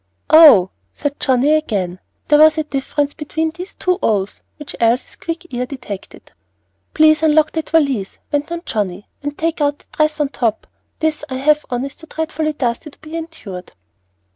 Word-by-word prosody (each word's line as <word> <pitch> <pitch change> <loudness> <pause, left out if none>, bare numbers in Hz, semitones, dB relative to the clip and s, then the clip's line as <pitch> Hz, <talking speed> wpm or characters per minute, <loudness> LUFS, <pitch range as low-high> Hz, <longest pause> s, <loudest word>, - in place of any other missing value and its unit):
"Oh!" 290 - +8 0.2
said 290 -1 -4
Johnnie 265 +3 +3
again. 195 - -1 0.3
There 295 0 +5
was 310 +1 +6
a 310 - +1
difference 290 0 -2
between 320 +1 -2
these 360 +4 -9
two 365 +1 0
"ohs," 205 -2 0 0.2
which 295 -2 -9
Elsie's 235 +2 +1
quick 335 -1 -6
ear 250 +1 -2
detected. 240 -8 -9 0.6
"Please 310 -1 +5
unlock 310 -1 +4
that 320 -1 -4
valise," 275 -11 +1
went 295 +2 -1
on 340 0 -4
Johnnie, 200 -2 -3
"and 290 0 -5
take 325 -1 -1
out 290 0 +1
the - - -25
dress 305 0 0
on 295 -2 +1
top. 230 -6 -1 0.3
This 315 -1 -1
I 260 - -3
have 300 +3 +2
on 245 +1 -2
is 275 - -7
too 320 - -14
dreadfully 315 -1 -2
dusty 250 +2 -2
to - - -19
be 315 +1 -10
endured." 275 - -8
295 Hz, 175 wpm, -18 LUFS, 245-315 Hz, 0.6 s, Oh